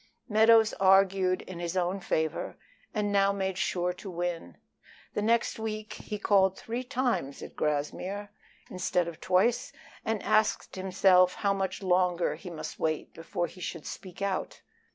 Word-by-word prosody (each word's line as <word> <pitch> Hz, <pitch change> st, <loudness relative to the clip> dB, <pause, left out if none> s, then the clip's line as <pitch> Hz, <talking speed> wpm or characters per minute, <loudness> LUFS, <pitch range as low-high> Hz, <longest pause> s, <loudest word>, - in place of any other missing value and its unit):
Meadows 220 Hz, 0 st, +5 dB
argued 190 Hz, -1 st, +4 dB
in 185 Hz, -2 st, -8 dB
his 175 Hz, +1 st, -3 dB
own 180 Hz, +2 st, 0 dB
favor, 160 Hz, -3 st, -2 dB, 0.3 s
and 210 Hz, -2 st, -1 dB
now 200 Hz, 0 st, +4 dB
made 190 Hz, -1 st, -2 dB
sure 180 Hz, -1 st, 0 dB
to 190 Hz, +2 st, -9 dB
win. 170 Hz, -, -4 dB, 0.6 s
The -, -, -1 dB
next 230 Hz, +1 st, +1 dB
week 215 Hz, -1 st, -4 dB
he 210 Hz, -, -6 dB
called 195 Hz, -2 st, +3 dB
three 235 Hz, +3 st, -4 dB
times 240 Hz, -, -1 dB
at -, -, -10 dB
Grassmere 180 Hz, +7 st, -2 dB, 0.4 s
instead 180 Hz, -1 st, 0 dB
of 170 Hz, -2 st, -8 dB
twice, 185 Hz, +6 st, +2 dB, 0.3 s
and 220 Hz, -2 st, -2 dB
asked 215 Hz, 0 st, +1 dB
himself 185 Hz, -1 st, +4 dB
how 200 Hz, -1 st, +1 dB
much 195 Hz, 0 st, -3 dB
longer 180 Hz, -1 st, +2 dB
he 185 Hz, -, -9 dB
must 165 Hz, -3 st, -7 dB
wait 155 Hz, -1 st, -1 dB
before 165 Hz, +1 st, -3 dB
he 185 Hz, -, -11 dB
should 165 Hz, -3 st, -5 dB
speak 185 Hz, +1 st, -7 dB
out. 195 Hz, -1 st, -3 dB
190 Hz, 155 wpm, -29 LUFS, 175-205 Hz, 0.6 s, Meadows